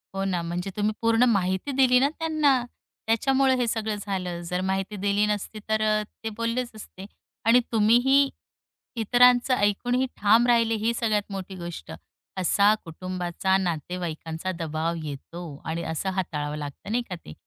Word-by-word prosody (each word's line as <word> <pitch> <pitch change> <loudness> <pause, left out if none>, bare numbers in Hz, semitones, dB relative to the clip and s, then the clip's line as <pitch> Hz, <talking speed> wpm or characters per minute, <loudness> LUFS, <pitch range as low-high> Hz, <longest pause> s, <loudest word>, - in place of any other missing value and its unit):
हो 195 - -1
ना. 180 -3 0
म्हणजे 175 +3 -3
तुम्ही 210 +1 +1
पूर्ण 230 +1 +3
माहिती 190 +4 0
दिली 255 -2 +4
ना 275 - +3
त्यांना, 310 -5 +2 0.5
त्याच्यामुळे 265 +4 +3
हे 245 -1 0
सगळं 220 -1 -1
झालं. 185 -4 -3
जर 180 0 -1
माहिती 195 +2 -2
दिली 205 +1 +3
नसती, 210 +1 -3
तर 220 0 +1
अ, 215 0 +2 0.2
ते 225 - -2
बोललेच 235 +1 -1
असते 195 -3 -10 0.4
आणि 230 +2 +6
तुम्हीही 245 +6 +4 0.7
इतरांचं 245 +3 +4
ऐकूनही 245 +5 +1
ठाम 220 +4 +4
राहिले, 230 -2 +3
ही 220 +2 0
सगळ्यात 215 -3 -1
मोठी 190 0 -6
गोष्ट. 170 - -7 0.5
असा 200 +3 +4
कुटुंबाचा, 185 +2 -1
नातेवाईकांचा, 170 -1 -3
दबाव 160 +1 -2
येतो 155 +4 -7 0.2
आणि 165 +1 -3
असं 160 +4 -2
हाताळावं 150 -6 -3
लागतं 145 +7 -7
नाही 240 +2 +1
का 180 - -3
ते. 75 - -9
205 Hz, 150 wpm, -25 LUFS, 180-235 Hz, 0.7 s, आणि